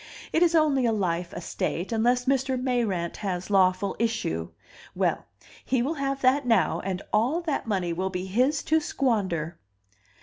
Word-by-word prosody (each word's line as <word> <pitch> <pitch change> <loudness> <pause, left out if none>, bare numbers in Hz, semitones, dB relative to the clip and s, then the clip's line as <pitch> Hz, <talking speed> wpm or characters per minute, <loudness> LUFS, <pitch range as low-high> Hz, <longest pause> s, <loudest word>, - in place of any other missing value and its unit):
It 320 - +2
is 345 -1 +4
only 285 -6 +3
a - - +2
life 180 -4 -1
estate, 175 +2 -3
unless 245 +2 +2
Mr. 265 -1 +1
Mayrant 230 -10 -1
has 185 -1 -4
lawful 190 0 +3
issue. 155 - -1 0.5
Well, - - 0 0.4
he 255 -2 +1
will 290 +6 -1
have 275 0 -1
that 270 +3 +3
now, 225 -2 +3
and 190 -1 -4
all 240 +10 +2
that 310 -8 -2
money 185 -5 -1
will 185 +3 -2
be 180 0 -4
his 255 +10 +1
to 320 +1 +3
squander." 195 - -1
225 Hz, 160 wpm, -26 LUFS, 185-265 Hz, 0.5 s, is